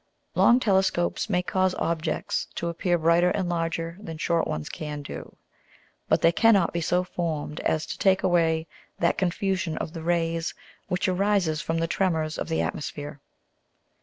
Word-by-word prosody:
Long 240 Hz, +1 st, +5 dB
Telescopes 190 Hz, -3 st, +1 dB
may 180 Hz, -2 st, +1 dB
cause 185 Hz, 0 st, +1 dB
Objects 160 Hz, -2 st, -1 dB
to 170 Hz, -, -2 dB
appear 175 Hz, +1 st, 0 dB
brighter 170 Hz, +2 st, +4 dB
and 180 Hz, 0 st, -1 dB
larger 165 Hz, 0 st, -2 dB
than 165 Hz, -6 st, -7 dB
short 165 Hz, +1 st, +1 dB
ones 75 Hz, 0 st, -3 dB
can 150 Hz, -2 st, -5 dB
do, -, -, -8 dB, 0.7 s
but -, -, +3 dB
they 165 Hz, -, +6 dB
cannot 200 Hz, -1 st, +4 dB
be 170 Hz, -, -1 dB
so 180 Hz, +2 st, +1 dB
formed 160 Hz, -4 st, -3 dB
as 155 Hz, 0 st, 0 dB
to -, -, -6 dB
take 190 Hz, -1 st, +3 dB
away 165 Hz, -3 st, +2 dB, 0.3 s
that 170 Hz, -, +1 dB
confusion 185 Hz, -2 st, -1 dB
of 160 Hz, -, -4 dB
the 165 Hz, -, -6 dB
Rays 165 Hz, 0 st, 0 dB, 0.3 s
which 180 Hz, +1 st, 0 dB
arises 185 Hz, -4 st, +1 dB
from 165 Hz, +1 st, -2 dB
the 165 Hz, -, +1 dB
Tremors 165 Hz, -3 st, 0 dB
of -, -, -4 dB
the 160 Hz, -, +1 dB
Atmosphere. 145 Hz, -1 st, -5 dB
170 Hz, 165 wpm, -26 LUFS, 160-185 Hz, 0.7 s, they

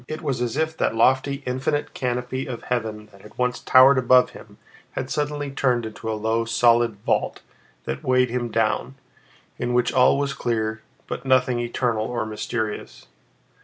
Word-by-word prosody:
It 155 Hz, +2 st, -6 dB
was 135 Hz, -5 st, -2 dB
as 120 Hz, +2 st, -2 dB
if 160 Hz, 0 st, 0 dB
that -, -, 0 dB
lofty, 135 Hz, +4 st, +2 dB
infinite 130 Hz, +4 st, -2 dB
canopy 125 Hz, +1 st, -3 dB
of 120 Hz, -3 st, -6 dB
heaven 110 Hz, -3 st, -3 dB
that 100 Hz, -, -18 dB
had 105 Hz, -, -16 dB
once 125 Hz, 0 st, 0 dB
towered 130 Hz, +1 st, +6 dB
above 125 Hz, 0 st, +4 dB
him -, -, -14 dB, 0.4 s
had 130 Hz, 0 st, -4 dB
suddenly 145 Hz, -1 st, -2 dB
turned 125 Hz, -4 st, +1 dB
into 110 Hz, 0 st, -5 dB
a 110 Hz, -, -2 dB
low, 110 Hz, +2 st, 0 dB
solid 115 Hz, 0 st, +3 dB
vault -, -, 0 dB, 0.4 s
that 65 Hz, +1 st, -5 dB
weighed 130 Hz, -1 st, +2 dB
him 120 Hz, -1 st, -2 dB
down, 110 Hz, +4 st, 0 dB, 0.6 s
in 120 Hz, 0 st, -1 dB
which 125 Hz, 0 st, +2 dB
all 130 Hz, +1 st, +5 dB
was 140 Hz, -1 st, -1 dB
clear, 110 Hz, -4 st, -2 dB, 0.2 s
but -, -, -5 dB
nothing 130 Hz, -2 st, +2 dB
eternal 120 Hz, -2 st, -1 dB
or 120 Hz, -1 st, -2 dB
mysterious. 110 Hz, 0 st, -4 dB
125 Hz, 165 wpm, -23 LUFS, 115-130 Hz, 0.6 s, towered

